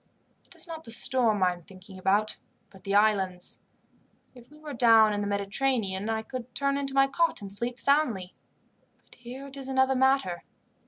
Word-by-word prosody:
It - - -17
is - - -6
not 325 -1 -8
the - - -11
storm 230 -3 +2
I 180 -1 +3
am 175 - -13
thinking 185 +2 -14
about, 205 +3 +1 0.3
but 190 - -17
the 195 0 -1
islands. 195 -4 +1 0.7
If 245 -2 -16
we 300 - -17
were 305 -1 -8
down 225 -3 +5
in 205 - -2
the 205 - -2
Mediterranean 200 0 -1
I 220 0 -1
could 250 +1 -8
turn 275 0 +1
into 275 -1 -2
my 270 0 +6
cot 330 +5 0
and 200 -1 -6
sleep 240 +4 -4
soundly; 255 -11 +1 0.7
but - - -19
here 250 +3 -10
it 275 0 -10
is 270 -1 -5
another 265 0 +2
matter. 265 -9 +1
235 Hz, 190 wpm, -27 LUFS, 200-270 Hz, 0.7 s, my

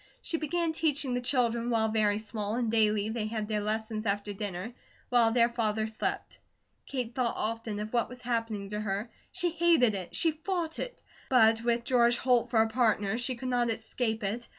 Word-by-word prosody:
She 330 - -1
began 325 +1 -1
teaching 295 -5 0
her 245 - 0
children 240 -2 +1
while 220 -2 +2
very 210 -2 +2
small, 215 -1 -3
and 235 -2 0
daily 215 -2 +2
they 220 -1 -2
had 215 -1 -3
their 215 -1 0
lessons 215 +1 -2
after 205 +1 -1
dinner, 200 +2 -5 0.4
while 235 -2 +4
their 235 0 +4
father 220 -2 0
slept. 220 0 -4 0.5
Kate 250 -4 -3
thought 245 -2 0
often 225 -1 -2
of 215 +2 -5
what 235 -1 +1
was 250 0 -10
happening 225 -4 -2
to 210 0 -3
her; 210 +2 -3 0.2
she 355 -2 -1
hated 330 -9 +4
it, 185 -3 -5
she 330 - +2
fought 325 +1 -3
it; - - -6 0.3
but 225 -3 +5
with 235 0 +1
George 240 -1 +3
Holt 250 -2 +2
for 220 -2 +4
a - - -1
partner 220 -2 +1
she 250 +1 -1
could 255 +2 -5
not 245 -1 +1
escape 225 0 -2
it. 225 +5 -2
230 Hz, 195 wpm, -29 LUFS, 215-250 Hz, 0.5 s, but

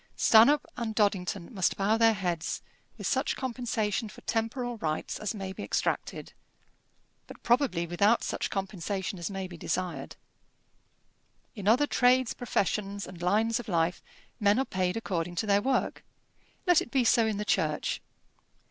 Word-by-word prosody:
Stanhope 255 +7 +6
and 225 -2 -3
Doddington 200 -1 0
must 190 -4 +1
bow 200 +3 +2
their 225 0 +5
heads, 175 -3 -2 0.3
with - - -7
such - - +1
compensation 230 -4 -2
for - - -13
temporal 235 +2 -2
rights 155 -6 -3
as 215 +1 -3
may 190 -2 -5
be - - -8
extracted, - - -2 0.9
but - - -13
probably 240 -8 +2
without 200 +7 +2
such - - -2
compensation 195 0 -3
as 170 - -3
may 195 -1 -4
be 180 -2 -9
desired. 180 +2 -3 1.4
In 205 -3 -6
other 250 +7 +5
trades, 255 -2 +3
professions, 200 -3 -1
and 180 -2 -11
lines 220 +6 +2
of 240 - -8
life, 170 -2 0 0.4
men 205 +1 +4
are 265 - +1
paid 185 -1 -1
according 175 -5 -3
to 200 - -1
their 200 -1 +3
work. 265 +3 0 0.6
Let 355 -3 +5
it - - -6
be 260 0 +2
so 230 -1 +4
in 215 -2 -1
the 210 - -3
Church. 155 -6 0
205 Hz, 155 wpm, -29 LUFS, 185-230 Hz, 1.4 s, Stanhope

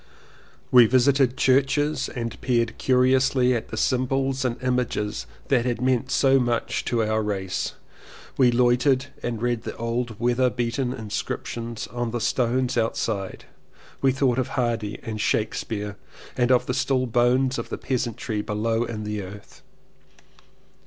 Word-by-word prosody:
We 125 -2 +8
visited 130 +1 +3
churches 140 +3 +2
and 115 -3 -5
peered 115 -3 0
curiously 130 0 +3
at 115 - -2
the - - -6
symbols 135 +1 0
and 125 -2 -1
images 115 - -1 0.2
that 125 -4 +3
had 120 -2 -1
meant 130 0 +1
so 135 -1 +4
much 120 -2 -1
to 115 -2 +1
our 110 0 0
race. 95 -3 -2 0.6
We 130 -2 +5
loitered 125 +2 +3 0.2
and 120 -2 -3
read 120 -2 0
the - - -6
old 115 -1 -3
weather 125 +2 +2
beaten 125 +1 -2
inscriptions 115 0 -4
on 120 +2 -3
the 120 +1 -3
stones 125 +1 +1
outside 110 -3 -2 0.3
— - - -25
we 135 - +4
thought 130 -1 +1
of 130 - 0
Hardy 115 -4 -1
and 110 -2 -4
Shakespeare 105 -1 -2 0.4
and 125 +1 +2
of 125 - +4
the 125 - -2
still 130 0 +1
bones 125 +2 +2
of - - -6
the - - -4
peasantry 120 -4 -2
below 115 +2 -1
in 110 -2 -5
the 105 0 -3
earth. 100 +2 -11
120 Hz, 145 wpm, -24 LUFS, 115-130 Hz, 0.6 s, We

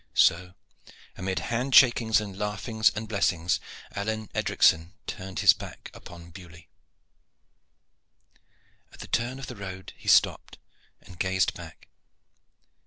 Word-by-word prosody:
So, 90 +2 +3 0.6
amid 95 +1 -3 0.2
hand 125 +3 0
shakings 120 -4 +6
and 100 -3 -7
laughings 105 +2 0
and 110 +1 -5
blessings, 90 -5 0 0.4
Alleyne 110 +1 -3
Edricson 80 +2 +2
turned 95 -2 -6
his - - +7
back - - -10
upon 85 -1 -13
Beaulieu. 85 -2 -13 2.3
At - - -13
the - - -9
turn 120 +2 -1
of 135 - -7
the 125 - -8
road 95 -2 -8
he - - -16
stopped - - +3 0.4
and 90 -2 -15
gazed 95 -1 +1
back. 80 -3 -12
95 Hz, 120 wpm, -26 LUFS, 90-110 Hz, 2.3 s, his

